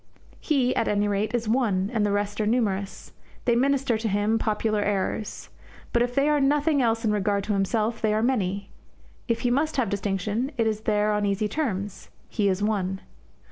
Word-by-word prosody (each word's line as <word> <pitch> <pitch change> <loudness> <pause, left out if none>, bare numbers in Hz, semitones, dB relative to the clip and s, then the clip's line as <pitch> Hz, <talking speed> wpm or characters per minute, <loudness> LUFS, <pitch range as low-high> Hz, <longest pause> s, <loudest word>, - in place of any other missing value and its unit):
He, 265 -5 +1
at - - +1
any 205 0 +1
rate, 205 +3 0
is 235 -2 -2
one, 215 -5 +1
and 220 -3 +1
the 205 - +1
rest 205 +1 -1
are 210 - 0
numerous. 205 -4 -1 0.3
They 235 - +3
minister 265 -2 +2
to 225 - -2
him 205 +2 +1
popular 215 -1 0
errors. 205 +1 -2 0.4
But 235 - +3
if 245 0 0
they 280 +1 +3
are 300 -1 +3
nothing 290 +1 +2
else 225 -1 +1
in 215 - +2
regard 200 -1 0
to 210 - -1
himself, 215 +3 0
they 215 - +2
are 215 +1 +1
many. 200 -6 -1 0.6
If 230 -2 0
he 245 - +1
must 300 +4 0
have 240 -6 +1
distinction, 205 +5 -1
it 230 - +2
is 215 -1 -1
there 210 0 +2
on 210 -1 0
easy 200 +2 0
terms 205 -7 -3 0.2
he 205 -3 +1
is 190 +2 0
one. 190 -3 -1
215 Hz, 195 wpm, -25 LUFS, 205-240 Hz, 0.6 s, They